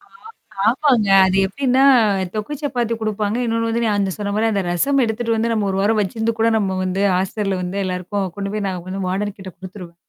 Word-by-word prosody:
ஆ. 400 - -25 0.7
ஆமாங்க. 250 -6 +2 0.2
அது 185 - +1
எப்படின்னா 265 +5 +1 0.5
தொக்கு 215 +8 -3
சப்பாத்தி 240 -5 -1
குடுப்பாங்க. 215 0 -1
இன்னொன்னு 230 0 0
வந்து 235 +1 0
நான் 210 -2 +1
அந்த 195 -1 -1
சொன்ன 200 -1 -3
மாரி 225 +1 +2
அந்த 200 -2 0
ரசம் 275 +10 +2
எடுத்துட்டு 230 +1 -1
வந்து 230 +1 0
நம்ம 210 -3 0
1 190 - -2
வாரம் 215 +1 +2
வச்சிருந்து 220 +3 -2
கூட 230 - +3
நம்ம 190 -3 -1
வந்து 185 +1 -1
ஹாஸ்டல்ல 195 +1 -1
வந்து 180 +3 -4
எல்லாருக்கும் 185 +1 -3
கொண்டு 200 0 -4
போய் 210 -2 -2
நான் 180 -2 -5
வந்து 190 0 -4
வார்டன் 200 +2 -2
கிட்ட 190 -1 -8
குடுத்துருவே 185 -2 -10
205 Hz, 200 wpm, -20 LUFS, 190-230 Hz, 0.7 s, கூட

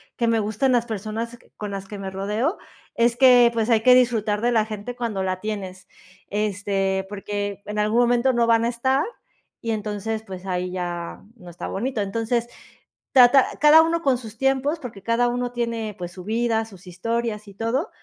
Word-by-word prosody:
que 235 - 0
me 230 -1 +2
gustan 220 +5 0
las 240 -1 +2
personas 225 +2 -5 0.2
con 210 -1 -5
las 195 -1 -6
que 205 - -7
me 195 -1 -6
rodeo, 210 - -1 0.3
es 235 0 +2
que, 245 -2 +7
pues, 230 0 0
hay 220 -1 +4
que 250 +1 +7
disfrutar 220 -4 +2
de 240 +1 +2
la 225 -2 +3
gente 215 +3 -6
cuando 225 -6 -2
la 185 0 -2
tienes, 195 -3 -5 0.4
este, 195 -2 -1
porque 205 0 -4
en 210 0 -4
algún 215 +3 +2
momento 245 +2 +3
no 240 -1 +2
van 230 0 +3
a - - +2
estar 260 +4 +1 0.6
y 230 - -3
entonces, 215 +1 -3
pues 190 -2 -9
ahí 180 -1 -2
ya 175 -2 -4 0.2
no 180 -6 -13
está 175 - -7
bonito. 235 +2 -2
Entonces, 230 +4 -1 0.7
trata 255 +1 +7
cada 300 +2 +8
uno 335 +1 0
con 270 -3 +3
sus 225 -2 -10
tiempos, 270 +4 +1
porque 230 -8 -9
cada 235 +2 +2
uno 245 0 -2
tiene, 230 -3 -3
pues 175 -1 -6
su 180 -1 -9
vida, 225 +1 0
sus 195 -4 -15
historias 215 +3 -3
y 200 - -13
todo. 235 - -1
225 Hz, 190 wpm, -23 LUFS, 200-240 Hz, 0.7 s, cada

